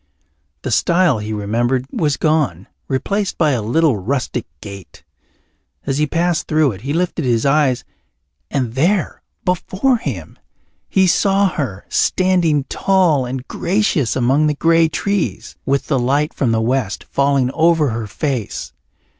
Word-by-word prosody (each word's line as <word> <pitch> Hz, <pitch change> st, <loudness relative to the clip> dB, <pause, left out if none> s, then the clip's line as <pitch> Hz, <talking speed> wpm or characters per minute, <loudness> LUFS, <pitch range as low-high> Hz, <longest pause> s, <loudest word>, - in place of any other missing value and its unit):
The -, -, -3 dB
stile 170 Hz, -1 st, +3 dB
he 105 Hz, +1 st, -5 dB
remembered 120 Hz, +5 st, -1 dB
was 150 Hz, -3 st, 0 dB
gone, 145 Hz, -, 0 dB, 0.2 s
replaced 195 Hz, +9 st, -1 dB
by 155 Hz, -3 st, +3 dB
a 125 Hz, -4 st, 0 dB
little 130 Hz, +4 st, +2 dB
rustic 125 Hz, +3 st, -2 dB
gate. 100 Hz, 0 st, -11 dB, 0.8 s
As 135 Hz, +1 st, -1 dB
he 150 Hz, -, +2 dB
passed 170 Hz, +1 st, 0 dB
through 155 Hz, -3 st, +2 dB
it 100 Hz, -2 st, -10 dB
he 135 Hz, +4 st, -4 dB
lifted 170 Hz, 0 st, -1 dB
his 120 Hz, -2 st, +1 dB
eyes 140 Hz, -3 st, +2 dB, 0.7 s
and 125 Hz, -5 st, -2 dB
there 175 Hz, +9 st, 0 dB, 0.2 s
before 190 Hz, +8 st, +1 dB
him 100 Hz, -, -6 dB, 0.5 s
he 190 Hz, -1 st, +3 dB
saw 195 Hz, +3 st, +3 dB
her, 125 Hz, -, -4 dB
standing 175 Hz, -6 st, +2 dB
tall 165 Hz, -5 st, +1 dB
and 130 Hz, +1 st, -5 dB
gracious 175 Hz, -, 0 dB
among 135 Hz, +5 st, +2 dB
the 150 Hz, -, 0 dB
grey 165 Hz, +2 st, +3 dB
trees, 200 Hz, +4 st, -2 dB
with 140 Hz, 0 st, +1 dB
the 135 Hz, -4 st, 0 dB
light 140 Hz, +5 st, +1 dB
from 125 Hz, -4 st, 0 dB
the 110 Hz, 0 st, +1 dB
west 120 Hz, -3 st, -1 dB
falling 140 Hz, -2 st, +1 dB
over 160 Hz, -1 st, +3 dB
her 110 Hz, -1 st, -4 dB
face. 130 Hz, -2 st, -3 dB
140 Hz, 145 wpm, -18 LUFS, 125-165 Hz, 0.8 s, stile